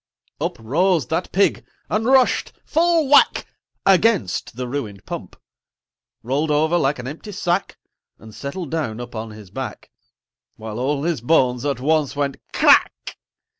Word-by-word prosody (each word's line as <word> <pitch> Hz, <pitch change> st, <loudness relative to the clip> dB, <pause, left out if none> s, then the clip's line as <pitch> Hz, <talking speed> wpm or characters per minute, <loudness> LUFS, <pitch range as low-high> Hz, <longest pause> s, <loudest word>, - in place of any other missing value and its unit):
Uprose 160 Hz, -, 0 dB
that 165 Hz, +3 st, -2 dB
Pig, 200 Hz, +2 st, +2 dB, 0.2 s
and 220 Hz, +2 st, -1 dB
rushed, 260 Hz, -1 st, +3 dB
full 330 Hz, -2 st, +2 dB
whack, 285 Hz, +1 st, +5 dB, 0.4 s
Against 190 Hz, -, +2 dB
the 125 Hz, 0 st, -4 dB
ruined 110 Hz, -8 st, -5 dB
Pump: -, -, -7 dB, 0.9 s
Rolled 140 Hz, +6 st, -1 dB
over 155 Hz, +3 st, +2 dB
like 140 Hz, -1 st, +1 dB
an 125 Hz, 0 st, -7 dB
empty 160 Hz, +9 st, -8 dB
sack 190 Hz, -1 st, -1 dB, 0.4 s
And 110 Hz, -1 st, -14 dB
settled 140 Hz, -, -6 dB
down 140 Hz, -9 st, -2 dB
upon 115 Hz, -2 st, -6 dB
his 105 Hz, -3 st, -12 dB
back -, -, -7 dB, 0.6 s
While 110 Hz, 0 st, -7 dB
all 140 Hz, +2 st, -1 dB
his 165 Hz, -6 st, -1 dB
bones 125 Hz, -2 st, +2 dB
at 140 Hz, -4 st, -1 dB
once 150 Hz, +1 st, +1 dB
went 140 Hz, -1 st, -1 dB
"Crack!" -, -, +3 dB
145 Hz, 135 wpm, -21 LUFS, 120-180 Hz, 0.9 s, whack